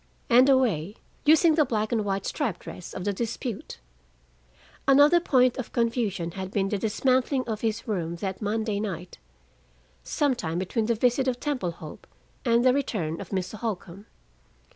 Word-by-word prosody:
And 250 +3 +7
a 270 - +6
way 205 -7 0 0.3
using 315 +2 +6
the 305 0 +4
black 220 -5 -1
and 225 -3 +1
white 195 -1 -2
striped 255 - -2
dress 180 - -9
of 185 - -4
the 205 - 0
dispute. 230 +1 -4 1.1
Another 290 +5 +6
point 255 -6 +3
of 255 - -5
confusion 230 -7 -1
had 190 +1 -5
been 195 0 0
the 205 - -1
dismantling 255 +5 +1
of 220 -2 -3
his 225 0 -2
room 170 -6 -2
that 190 +3 -5
Monday 215 0 -1
night, 185 -4 -5 0.8
some 290 - +1
time 170 -9 -3
between 200 +5 -1
the 235 - +2
visit 250 +4 +2
of 250 -1 0
Temple 255 - -2
Hope 155 -2 -11 0.4
and 235 0 +3
the 255 - +6
return 195 - -2
of 195 - -9
Mr. 195 +2 -3
Holcombe. 200 -3 -5
220 Hz, 165 wpm, -26 LUFS, 190-255 Hz, 1.1 s, And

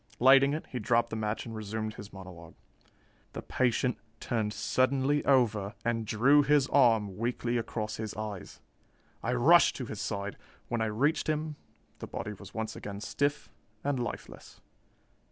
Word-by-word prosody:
Lighting 135 +3 +6
it, 155 - -5
he 125 - -4
dropped 115 +2 +1
the - - -2
match 110 0 -2
and 115 -1 -7
resumed 110 0 -4
his 100 -1 -10
monologue. 90 -4 -11 0.8
"The - - -6
patient 125 0 0 0.2
turned 110 -3 -1
suddenly 135 +5 +1
over 110 -6 +2
and 115 -2 -1
drew 135 +8 +5
his 145 -1 +3
arm 110 -8 +3
weakly 120 +1 -1
across 110 -2 -3
his 110 -2 -5
eyes. 105 -3 -6 0.6
I 120 - -1
rushed 160 +8 +5
to 130 - -4
his 105 -3 -6
side. 100 -1 -3 0.3
When 120 -2 -1
I - - +2
reached 140 +10 +1
him, 155 0 -1 0.4
the - - -6
body 105 - -5
was 100 0 -12
once 110 0 -4
again 100 -1 -7
stiff 145 +7 -2 0.3
and 140 -2 0
lifeless. 120 -3 -7
115 Hz, 155 wpm, -30 LUFS, 105-135 Hz, 0.8 s, Lighting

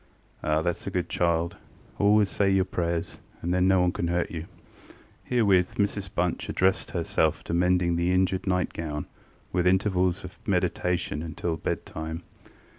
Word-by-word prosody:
ŌĆØ - - -2
ŌĆ£Ah, 75 +1 +2
thatŌĆÖs 85 +2 -2
a - - +1
good 90 -2 -2
child: 85 0 0 0.4
always 105 0 +5
say 100 0 +1
your 95 -1 +3
prayers, 85 -2 -2 0.2
and 90 +1 0
then 90 0 +3
no 95 -1 +4
one 90 0 +3
canŌĆÖt 85 -1 -2
hurt 85 0 0
you. 80 - -4
ŌĆØ - - -8 0.8
Herewith 100 -7 +3
Mrs 100 -2 -1
Bunch 90 0 -1
addressed 95 +1 +1
herself 80 -2 0
to - - -4
mending 90 0 +2
the 85 +1 +1
injured 95 +1 +1
nightgown, 85 -5 -1 0.5
with 90 0 +2
intervals 95 -1 +2
of 90 +1 -10
meditation, 90 -4 0
until 80 +1 -3
bed 80 - -3
time. 80 +2 -6
90 Hz, 165 wpm, -27 LUFS, 85-95 Hz, 0.8 s, always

